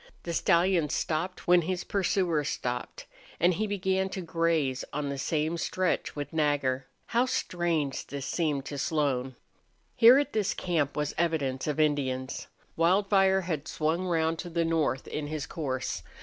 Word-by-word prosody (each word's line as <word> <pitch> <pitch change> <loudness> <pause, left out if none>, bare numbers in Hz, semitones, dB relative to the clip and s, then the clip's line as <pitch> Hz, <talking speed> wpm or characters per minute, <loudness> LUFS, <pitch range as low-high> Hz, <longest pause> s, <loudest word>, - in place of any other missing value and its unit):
The 170 - -4
stallion 170 -2 +3
stopped 165 +4 -2
when 175 0 +6
his 180 +2 -2
pursuers 180 -6 0
stopped. 125 0 -4 0.3
And 175 +2 +4
he 215 +5 -1
began 190 -1 0
to 190 - -4
graze 165 -6 0
on 145 0 -2
the 140 -1 -4
same 155 +4 -1
stretch 185 +1 -1
with 145 0 -5
Nagger. 145 -4 +1 0.2
How 245 +2 +1
strange 170 - -1
this 140 -1 -5
seemed 145 -2 -1
to 145 -1 -5
Slone! 135 -4 0 0.6
Here 235 +3 +8
at 290 0 0
this 210 -3 0
camp 155 -6 -1
was 150 0 -1
evidence 150 -6 0
of 150 0 -1
Indians. 135 -4 0 0.3
Wildfire 190 +2 +3
had 160 -5 -3
swung 165 +4 -1
round 165 -1 +1
to 175 - -5
the 170 0 0
north 155 -6 0
in 150 -1 -4
his 155 0 -3
course. 135 -6 -3
160 Hz, 155 wpm, -28 LUFS, 145-180 Hz, 0.6 s, Here